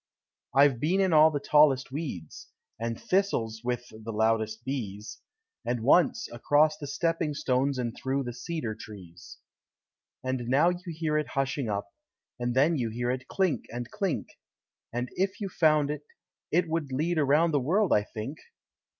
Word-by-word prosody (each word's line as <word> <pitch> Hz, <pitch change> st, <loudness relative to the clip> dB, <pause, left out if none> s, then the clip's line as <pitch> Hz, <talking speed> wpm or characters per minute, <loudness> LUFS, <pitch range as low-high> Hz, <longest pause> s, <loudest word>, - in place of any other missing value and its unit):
I've 140 Hz, -3 st, +5 dB
been 170 Hz, +8 st, +1 dB
in 190 Hz, -3 st, +3 dB
all 155 Hz, 0 st, +7 dB
the 145 Hz, -2 st, -2 dB
tallest 140 Hz, -3 st, +4 dB
weeds, 130 Hz, -, -6 dB, 0.3 s
And 115 Hz, 0 st, -3 dB
thistles 115 Hz, -, 0 dB
(with 120 Hz, 0 st, -2 dB
the 110 Hz, +1 st, -8 dB
loudest 110 Hz, +1 st, 0 dB
bees); 110 Hz, -6 st, -5 dB, 0.4 s
And 120 Hz, -1 st, -2 dB
once, 165 Hz, +7 st, +4 dB
across 145 Hz, +6 st, +3 dB
the 145 Hz, -, -8 dB
stepping 160 Hz, 0 st, -1 dB
stones 135 Hz, +1 st, +1 dB
And 120 Hz, -2 st, -2 dB
through 135 Hz, +1 st, -1 dB
the 120 Hz, -1 st, -5 dB
cedar 120 Hz, -2 st, -4 dB
trees. 95 Hz, -6 st, -12 dB, 0.9 s
And 130 Hz, -2 st, -2 dB
now 140 Hz, +7 st, +4 dB
you 180 Hz, +1 st, -4 dB
hear 155 Hz, -1 st, 0 dB
it 150 Hz, -, -3 dB
hushing 135 Hz, -2 st, 0 dB
up, 100 Hz, 0 st, -2 dB, 0.5 s
And 120 Hz, 0 st, -1 dB
then 150 Hz, +4 st, +3 dB
you 115 Hz, -2 st, -1 dB
hear 120 Hz, +2 st, -1 dB
it 130 Hz, 0 st, -4 dB
clink 190 Hz, -5 st, 0 dB
and 120 Hz, +1 st, -6 dB
clink; 200 Hz, -5 st, -2 dB, 0.6 s
And 120 Hz, +1 st, -3 dB
if 190 Hz, +1 st, 0 dB
you 200 Hz, -2 st, -3 dB
found 155 Hz, -4 st, +3 dB
it, 150 Hz, -1 st, -4 dB, 0.5 s
it 175 Hz, +2 st, +2 dB
would 160 Hz, -4 st, -2 dB
lead 160 Hz, +5 st, 0 dB
Around 150 Hz, +4 st, +3 dB
the 145 Hz, -, +2 dB
world, 180 Hz, +10 st, +2 dB
I 105 Hz, -, +4 dB
think! 110 Hz, +7 st, -7 dB
135 Hz, 165 wpm, -28 LUFS, 120-155 Hz, 0.9 s, all